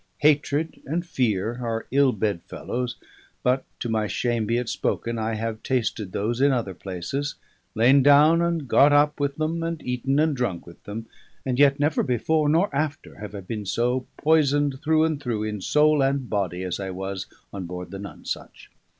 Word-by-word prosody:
Hatred 150 +1 +2
and 170 +5 -1
fear 120 - -1
are 115 -1 -2
ill 140 0 +4
bed 105 -5 -1
fellows; 125 0 -4 0.5
but 130 +1 +2 0.2
(to - - -2
my 110 -2 0
shame 120 -1 -1
be 115 +2 +1
it 125 -1 -2
spoken) 115 0 -2
I 110 0 -1
have 110 0 -3
tasted 115 -6 -1
those 115 +6 -1
in 140 0 +5
other 115 -7 -1
places, 95 - -4 0.4
lain 125 +5 +5
down 150 +4 +6
and 170 -4 0
got 145 +4 +5
up 150 +1 +3
with 140 -1 0
them, 155 +2 -1
and 165 -1 -2
eaten 125 +2 -1
and 155 -1 +3
drunk 115 -9 -2
with 85 - -15
them, 110 +2 -6 0.4
and 130 -1 -1
yet 140 0 +5
never 150 +1 +2
before, 150 +4 +1
nor 165 0 +2
after, 145 -7 -3
have 105 -1 -7
I 100 - -5
been 105 +1 -5
so 125 +5 0
poisoned 145 -3 +2
through 160 0 +3
and 160 -3 0
through, 115 -5 -2
in 105 -2 -3
soul 150 +6 +3
and 135 -1 +1
body, 95 -4 -2
as 90 0 -3
I 95 -1 -4
was 95 +1 -5 0.3
on 95 -3 -5
board 90 0 -7
the 100 - -6
Nonesuch. 100 - -7
125 Hz, 185 wpm, -24 LUFS, 105-145 Hz, 0.5 s, down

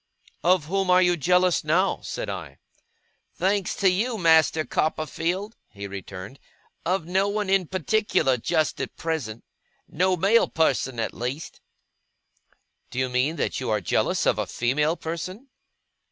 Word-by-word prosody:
'Of 175 -2 +3
whom 195 +3 -1
are 180 0 +6
you 175 -1 +3
jealous, 180 +2 +2
now?' 170 +6 +2
said - - -5
I. - - -6 0.8
'Thanks 195 0 0
to 195 - +2
you, 225 +6 0
Master 160 -3 +4
Copperfield,' 165 - -2
he 100 -1 -8
returned, 100 +4 -8 0.5
'of 185 -2 0
no 190 +3 +1
one 205 -1 -1
in 195 -3 +3
particular 185 -7 +1
just 155 +5 0
at - - -6
present 140 -10 -3 0.4
no 185 +3 +1
male 205 +7 +4
person, 135 -6 0
at - - -2
least.' 130 +6 -5 1.3
'Do - - -9
you 130 0 +1
mean 130 +6 +1
that - - -2
you 130 - -3
are 105 -1 +2
jealous 90 - 0
of - - +2
a - - -1
female 150 +7 0
person? 185 - -6
165 Hz, 145 wpm, -25 LUFS, 135-190 Hz, 1.3 s, are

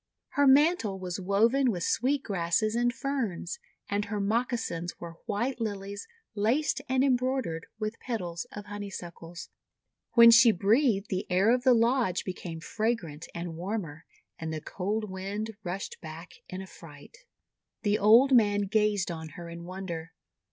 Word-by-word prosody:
Her 285 -1 +3
mantle 275 - +4
was 185 0 -5
woven 225 +8 +3
with 180 -6 -2
sweet 270 +8 +1
grasses 195 +2 0
and 240 +1 +2
ferns, 270 - -3 0.3
and 205 +1 -1
her 210 0 -3
moccasins 215 -5 -1
were 165 -1 -8
white 235 +4 -1
Lilies 200 -2 -4 0.3
laced 240 +8 +1
and 260 0 +3
embroidered 255 -10 0
with 215 +1 -4
petals 180 -9 -4
of 205 -1 -8
Honeysuckles. 180 -4 -8 0.6
When 235 -1 +9
she 230 0 +8
breathed, 215 +1 +2
the 190 -1 -2
air 190 +6 +4
of 250 - +1
the 250 0 +5
lodge 230 -5 +2
became 175 -3 -6
fragrant 185 -8 -2
and 170 -1 -5
warmer, 170 -4 -5 0.3
and 160 -1 -4
the 155 - -3
cold 205 +7 -3
wind 200 +3 -5
rushed 185 +3 -5
back 160 +1 -9 0.2
in 185 +1 -5
affright. 160 - -13 0.7
The 205 -1 +2
old 230 +7 +6
man 205 -3 +4
gazed 205 -2 +1
on 160 -1 -6
her 170 -1 -7
in 170 0 -8
wonder. 175 -3 -6
205 Hz, 145 wpm, -29 LUFS, 175-235 Hz, 0.7 s, When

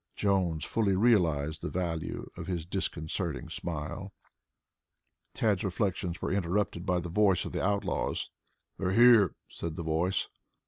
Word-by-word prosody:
Jones 90 -6 +1
fully 105 -4 +1
realized 80 -9 +2
the - - -3
value 85 -3 -3
of - - -7
his 85 -4 -2
disconcerting 85 -2 -3
smile. 85 +4 -4 1.2
Tad's 105 -4 +1
reflections 95 -2 -2
were - - -1
interrupted 95 -1 -1
by 90 -1 +2
the 85 - -5
voice 95 +1 +3
of - - -6
one - - -1
of - - -2
the 95 - +2
outlaws. 100 0 -1 0.5
"They're 95 -1 0
here," 115 -5 +6
said 85 -2 -6
the 85 - -4
voice. 80 +4 0
90 Hz, 145 wpm, -30 LUFS, 85-100 Hz, 1.2 s, here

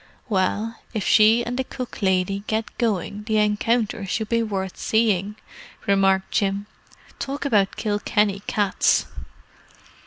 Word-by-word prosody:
"Well, 215 +3 0 0.2
if 215 - -1
she 220 +2 +5
and 245 +2 -3
the - - +1
cook 255 -2 -7
lady 190 +1 +1
get 220 0 -2
going 210 -3 -1
the 220 -1 +1
encounter 215 +1 +1
should 220 +3 -2
be 230 0 +2
worth 195 -4 -3
seeing," 210 -3 +1 0.5
remarked 195 -1 +2
Jim. 200 0 0 0.5
"Talk 280 +2 -4
about 205 -8 +2
the 215 - -6
Kilkenny 205 -1 +1
cats!" 205 -3 +2
210 Hz, 130 wpm, -23 LUFS, 195-225 Hz, 0.5 s, she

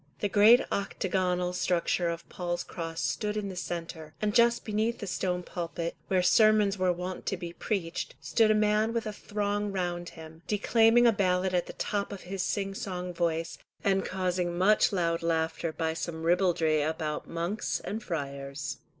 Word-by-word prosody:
The 205 - 0
great 215 +5 +7
octagonal 180 -2 -1
structure 175 -1 +1
of 170 0 -5
Paul's 175 -1 -3
Cross 165 -1 -5
stood 210 -1 -1
in 205 -2 -2
the 190 - -7
centre, 165 -3 -6
and 210 -1 0
just 235 +1 +4
beneath 220 +2 0
the 205 - -6
stone 180 -1 -2
pulpit, 170 -1 -4
where 185 -1 +2
the - - -2
sermons 215 -1 +5
were 185 -2 +2
wont 180 +1 -5
to 195 - 0
be 170 -1 -6
preached, 180 -4 -3
stood 225 -2 +2
a 215 - +5
man 215 +1 +2
with 230 -1 -1
a 215 - -3
throng 205 0 -2
round 175 -2 -2
him, 160 0 -11
declaiming 225 +3 +4
a 235 - +7
ballad 185 -2 +1
at 175 -1 +1
the - - -7
top 205 0 -2
of 200 - -7
his 190 +1 -4
sing 195 +1 -1
song 180 -2 -4
voice, 165 -1 -1 0.2
and 195 -1 +2
causing 180 -2 -1
much 205 +4 +4
loud 170 -3 0
laughter 165 0 0
by 160 0 -1
some 160 0 -5
ribaldry 165 -3 +2
about 155 0 -2
monks 170 +5 -2
and 220 +2 -5
friars. 140 -4 -4
180 Hz, 175 wpm, -29 LUFS, 170-205 Hz, 0.2 s, great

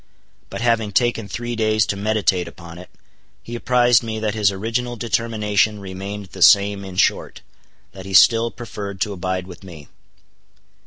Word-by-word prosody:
But - - -6
having 115 -3 +1
taken 115 0 0
three 120 +3 -5
days 110 -1 +1
to - - -2
meditate 100 -4 0
upon 85 0 -11
it, 90 - -12 0.5
he 120 - -9
apprised 120 0 +3
me 110 -2 -5
that 110 -1 -2
his 105 -2 +2
original 115 +5 -3
determination 110 -1 0
remained 100 +1 -7
the 95 - -10
same; 100 0 +5
in 95 -1 -9
short, - - 0 0.5
that 95 0 -11
he 95 - -3
still 115 +4 +5
preferred 100 -5 -8
to 105 - -1
abide 95 0 -3
with 90 +1 -13
me. 80 -6 -12
105 Hz, 160 wpm, -20 LUFS, 95-115 Hz, 0.5 s, same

